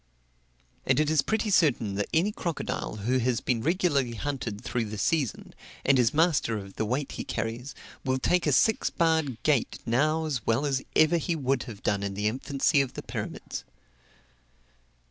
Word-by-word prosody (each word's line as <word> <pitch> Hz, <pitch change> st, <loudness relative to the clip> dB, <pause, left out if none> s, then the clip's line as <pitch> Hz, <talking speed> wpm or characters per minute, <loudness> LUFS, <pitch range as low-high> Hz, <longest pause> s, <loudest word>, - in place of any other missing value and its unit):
And -, -, +2 dB
it 155 Hz, 0 st, +2 dB
is 155 Hz, -3 st, +4 dB
pretty 220 Hz, +3 st, -1 dB
certain 130 Hz, -, +3 dB
that 100 Hz, +1 st, -2 dB
any 175 Hz, +6 st, +2 dB
crocodile, 170 Hz, -, -3 dB
who 130 Hz, +2 st, +2 dB
has 125 Hz, -1 st, +1 dB
been 120 Hz, -4 st, -1 dB
regularly 145 Hz, -, +1 dB
hunted 125 Hz, -5 st, -4 dB
through 120 Hz, +1 st, -2 dB
the 105 Hz, 0 st, -6 dB
season, 140 Hz, +3 st, -1 dB, 0.3 s
and 135 Hz, -1 st, +5 dB
is 120 Hz, -2 st, +4 dB
master 155 Hz, -8 st, +2 dB
of 100 Hz, -1 st, -8 dB
the 110 Hz, -, -2 dB
weight 130 Hz, +6 st, -2 dB
he -, -, -5 dB
carries, 115 Hz, +4 st, -4 dB, 0.3 s
will 130 Hz, 0 st, +1 dB
take 175 Hz, +7 st, +1 dB
a -, -, +3 dB
six 220 Hz, -, +3 dB
barred 160 Hz, -7 st, +1 dB
gate 145 Hz, -6 st, +1 dB
now 155 Hz, +7 st, +1 dB
as 135 Hz, -7 st, -2 dB
well 115 Hz, +6 st, +1 dB
as 135 Hz, -2 st, 0 dB
ever 155 Hz, +2 st, +5 dB
he 165 Hz, +1 st, -1 dB
would 135 Hz, -3 st, 0 dB
have 105 Hz, -3 st, -10 dB
done 100 Hz, -1 st, +1 dB
in 100 Hz, -1 st, -3 dB
the 105 Hz, +1 st, 0 dB
infancy 140 Hz, +5 st, +1 dB
of 135 Hz, -, -3 dB
the -, -, -6 dB
pyramids. -, -, -5 dB
135 Hz, 180 wpm, -27 LUFS, 115-155 Hz, 0.3 s, and